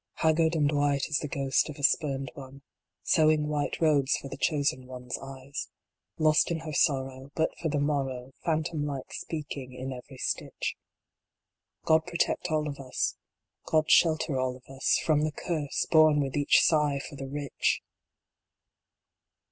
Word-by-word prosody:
Haggard 160 Hz, +1 st, +2 dB
and 150 Hz, -2 st, +2 dB
white 145 Hz, -2 st, +1 dB
as 155 Hz, -, +1 dB
the 150 Hz, -, -4 dB
ghost 135 Hz, 0 st, +1 dB
of 150 Hz, -, -7 dB
a 145 Hz, -, -9 dB
Spurned 135 Hz, -3 st, +1 dB
One, 135 Hz, 0 st, -11 dB, 0.4 s
Sewing 155 Hz, -1 st, +3 dB
white 150 Hz, -1 st, -2 dB
robes 145 Hz, -4 st, +3 dB
for 135 Hz, -, -8 dB
the -, -, -6 dB
Chosen 140 Hz, -4 st, 0 dB
One 125 Hz, -1 st, -9 dB
s 125 Hz, -, -4 dB
eyes 135 Hz, 0 st, -7 dB, 0.5 s
Lost 155 Hz, -1 st, +4 dB
in 165 Hz, -2 st, -2 dB
her 155 Hz, -1 st, -6 dB
sorrow, 135 Hz, -2 st, 0 dB
But 160 Hz, -, +1 dB
for 165 Hz, -, 0 dB
the 145 Hz, -1 st, 0 dB
morrow 135 Hz, -3 st, -1 dB
Phantom 160 Hz, -1 st, -1 dB
like 140 Hz, -3 st, -5 dB
speaking 145 Hz, -5 st, -6 dB
in 130 Hz, +1 st, -5 dB
every 130 Hz, +2 st, -11 dB
stitch -, -, -3 dB, 1.1 s
God 160 Hz, +1 st, +3 dB
protect 170 Hz, -1 st, 0 dB
all 155 Hz, -1 st, 0 dB
of 145 Hz, -1 st, -6 dB
us 130 Hz, -2 st, -2 dB, 0.5 s
God 155 Hz, -1 st, +2 dB
shelter 155 Hz, -4 st, +4 dB
all 130 Hz, -1 st, -1 dB
of 125 Hz, -, -16 dB
us 135 Hz, -, +2 dB
From 155 Hz, -2 st, +3 dB
the 155 Hz, 0 st, 0 dB
Curse, 150 Hz, -5 st, -2 dB
born 155 Hz, -2 st, +6 dB
with 135 Hz, -2 st, -1 dB
each 145 Hz, -1 st, +4 dB
sigh 150 Hz, -3 st, +3 dB
for -, -, -10 dB
the 135 Hz, -1 st, -6 dB
Rich 145 Hz, 0 st, -1 dB
145 Hz, 165 wpm, -28 LUFS, 135-155 Hz, 1.1 s, born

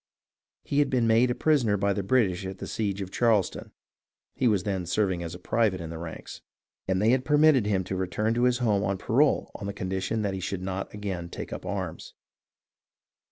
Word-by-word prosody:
He 140 Hz, -, 0 dB
had 145 Hz, -, +3 dB
been 125 Hz, -3 st, +2 dB
made 115 Hz, +2 st, +4 dB
a 120 Hz, -, 0 dB
prisoner 125 Hz, -8 st, +2 dB
by 100 Hz, 0 st, +1 dB
the 100 Hz, -, -2 dB
British 100 Hz, -3 st, +1 dB
at 95 Hz, 0 st, -6 dB
the -, -, -6 dB
siege 100 Hz, -2 st, -2 dB
of 95 Hz, -1 st, -6 dB
Charleston 110 Hz, -6 st, +1 dB, 0.6 s
(he 130 Hz, -, +1 dB
was 100 Hz, -5 st, +2 dB
then 95 Hz, -4 st, -2 dB
serving 95 Hz, -1 st, 0 dB
as 85 Hz, 0 st, -5 dB
a -, -, -7 dB
private 105 Hz, +1 st, +1 dB
in 85 Hz, -1 st, -6 dB
the 80 Hz, -, -6 dB
ranks), 80 Hz, -1 st, -8 dB, 0.5 s
and 95 Hz, -1 st, +1 dB
they 105 Hz, +3 st, +3 dB
had 130 Hz, 0 st, +2 dB
permitted 150 Hz, -5 st, +4 dB
him 95 Hz, -3 st, +1 dB
to 95 Hz, +1 st, -4 dB
return 95 Hz, +4 st, -1 dB
to 120 Hz, +1 st, +2 dB
his 125 Hz, -1 st, +3 dB
home 105 Hz, -5 st, +1 dB
on 100 Hz, -1 st, 0 dB
parole 135 Hz, +10 st, +2 dB
on 100 Hz, -, -6 dB
the 100 Hz, -, -3 dB
condition 95 Hz, +3 st, -2 dB
that 100 Hz, -1 st, -1 dB
he 95 Hz, -, -3 dB
should 95 Hz, 0 st, -4 dB
not 95 Hz, 0 st, -4 dB
again 95 Hz, -5 st, -5 dB
take -, -, -7 dB
up -, -, -7 dB
arms. -, -, -5 dB
100 Hz, 210 wpm, -27 LUFS, 95-115 Hz, 0.6 s, made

